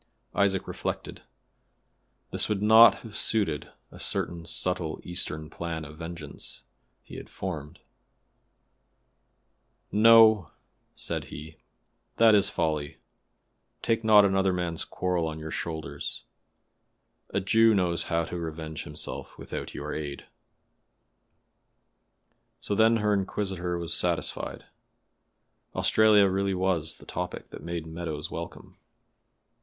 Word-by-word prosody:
Isaac 95 -2 +1
reflected. - - -5 1.1
This - - +2
would 105 -1 -1
not 110 0 +8
have 110 -2 -9
suited 100 -10 0 0.2
a - - -13
certain 85 -1 -3
subtle 90 -3 -1
Eastern 80 -3 -1
plan 80 -1 -5
of 75 +1 -12
vengeance 85 0 -7 0.4
he - - -10
had - - -9
formed. 80 -6 -6 2.1
"No!" 110 -3 +7 0.5
said - - -3
he, 80 +2 -10 0.6
"that 115 -1 +6
is 100 -1 +5
folly. 75 -5 -2 0.9
Take 115 0 +1
not 105 -2 +7
another 95 -1 +2
man's 85 -2 -2
quarrel 90 -3 -1
on 80 -1 -5
your 80 0 -7
shoulders. 80 -6 -5 1.1
A - - 0
Jew 110 +3 +4
knows 90 -3 +1
how 85 0 0
to 90 - -5
revenge 80 -1 -6
himself - - -6
without - - -6
your 75 +1 -5
aid." 75 -2 -5 2.3
So - - -3
then 110 +2 +4
her 105 -1 +1
inquisitor 95 -3 -2
was 85 -2 +1
satisfied; - - -1 1.1
Australia 105 -2 +5
really 95 0 0
was 90 -4 0
the - - -16
topic 90 0 -5
that - - -10
made 85 -1 -4
Meadows 80 -2 -5
welcome. - - -8
90 Hz, 115 wpm, -27 LUFS, 80-100 Hz, 2.3 s, not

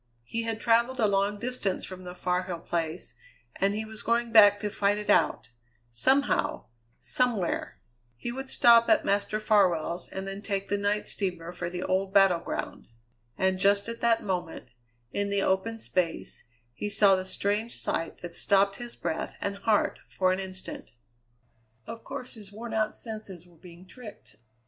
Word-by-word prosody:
He 230 - -3
had 225 -1 -3
travelled 235 +3 +2
a 225 - +4
long 200 0 +1
distance 235 -4 -3
from 185 -1 -9
the 180 0 -8
Far 180 0 0
Hill 175 -2 -6
Place, 165 -6 -3 0.4
and 200 +1 +1
he 220 +1 -3
was 220 0 -6
going 235 +1 0
back 205 -2 +7
to 210 -1 -2
fight 200 +1 +1
it 210 -1 0
out 120 - +2 0.4
somehow, 265 - +1 0.3
somewhere. 235 -9 -1 0.4
He 240 - -4
would 265 +2 -6
stop 235 -1 +6
at 325 - +4
Master 205 +1 0
Farwell's 180 -6 +1
and 190 0 -6
then 195 +1 -6
take 200 -2 -3
the 205 - +1
night 205 +1 0
steamer 175 -4 -3
for 175 -1 -4
the 180 +1 -5
old 190 +1 -1
battle 195 -3 +6
ground. - - -5 0.5
And 190 0 +1
just 200 +1 +3
at 230 0 -6
that 230 -1 +2
moment, 175 -9 -4 0.4
in 200 0 -1
the 200 -1 +1
open 190 +4 0
space, 180 -6 -3 0.3
he 210 - -4
saw 200 -1 +5
the 185 - -2
strange 205 +4 -1
sight 165 - -3
that 175 -1 -6
stopped 195 +1 +2
his 240 -1 -8
breath 160 - -4
and 200 0 -3
heart 210 +1 +1
for 185 -1 +1
an 185 - -2
instant. 185 - -7 1.0
Of 230 - -8
course 265 -2 -2
his 210 -4 -4
wornout 220 0 0
senses 215 -6 -3
were 175 -1 -21
being 175 +1 -14
tricked. 220 +2 -13
200 Hz, 170 wpm, -28 LUFS, 185-220 Hz, 1.0 s, back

